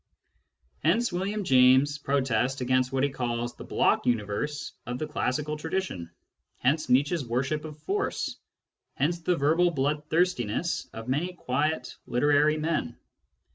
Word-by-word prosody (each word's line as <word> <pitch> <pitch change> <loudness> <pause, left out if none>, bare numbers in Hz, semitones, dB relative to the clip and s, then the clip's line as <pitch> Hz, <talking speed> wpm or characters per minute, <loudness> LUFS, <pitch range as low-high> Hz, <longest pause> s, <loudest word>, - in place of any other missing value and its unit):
Hence 220 +9 +2
William 200 +4 -2
James's 130 0 +5
protest 135 -2 0
against 130 0 +1
what 135 0 0
he 140 - +3
calls 120 -2 -2
the - - -10
"block - - +1
universe" 120 +6 -1 0.2
of 120 +1 -3
the 155 - -3
classical 150 0 -2
tradition; 160 - -3 0.5
hence 150 +5 +1
Nietzsche's 145 +5 +3
worship 135 +6 -1
of 150 -1 -8
force; 405 +1 -2 0.6
hence 165 +5 0
the 175 +2 +1
verbal 160 +5 +3
bloodthirstiness 150 - 0
of 115 +1 -8
many 155 +8 -1
quiet 145 -3 -1
literary 145 +4 +3
men. 155 -6 -2
145 Hz, 130 wpm, -27 LUFS, 125-160 Hz, 0.6 s, James's